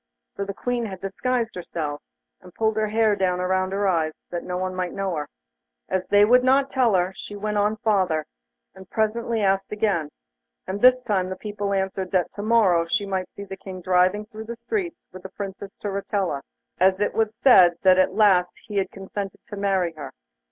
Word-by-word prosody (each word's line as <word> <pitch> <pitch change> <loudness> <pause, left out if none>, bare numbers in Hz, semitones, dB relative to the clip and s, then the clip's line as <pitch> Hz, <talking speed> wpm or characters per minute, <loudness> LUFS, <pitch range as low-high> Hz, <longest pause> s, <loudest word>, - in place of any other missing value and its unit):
For 200 - -3
the 200 - -5
Queen 245 -1 -2
had 190 -2 -7
disguised 230 +4 -2
herself, 155 -4 -5 0.4
and 180 - -14
pulled 220 -1 +1
her 215 0 +1
hair 215 0 +2
down 185 -2 0
about 185 +1 0
her 200 +1 0
eyes, 160 -4 +1 0.2
that 175 - -3
no 180 0 -3
one 185 0 -2
might 185 -1 -3
know 195 -2 -2
her. 150 -1 -3 0.6
As 185 0 -1
they 205 0 +6
would 250 +3 +5
not 270 +1 +3
tell 245 -6 +3
her, 180 +1 +1
she 205 - -8
went 210 0 -2
on 210 +2 +1
farther, 190 -8 +1 0.5
and 190 -1 -14
presently 225 +1 0
asked 195 0 +1
again, 200 -8 0 0.6
and 195 +2 -4
this 255 0 +7
time 190 -5 0
the 185 - -4
people 205 0 -4
answered 190 -1 -1
that 185 -2 +1
to 205 - -6
morrow 205 -7 +3
she 205 +3 0
might 190 -2 -3
see 200 - -7
the 195 -1 -7
King 190 -1 -8
driving 185 +3 +2
through 220 0 -9
the 235 +1 -6
streets 340 - -3 0.2
with 185 - -9
the 190 - -8
Princess 195 0 -7
Turritella, 195 -6 -2 0.4
as 190 +1 +4
it 205 - 0
was 220 0 0
said 185 -10 +7
that 185 -1 +6
at 185 0 +2
last 190 -4 +4
he 205 - -5
had 190 -1 +1
consented 195 0 -6
to 205 - -6
marry 190 -4 0
her. 155 - -8
195 Hz, 200 wpm, -24 LUFS, 185-215 Hz, 0.6 s, this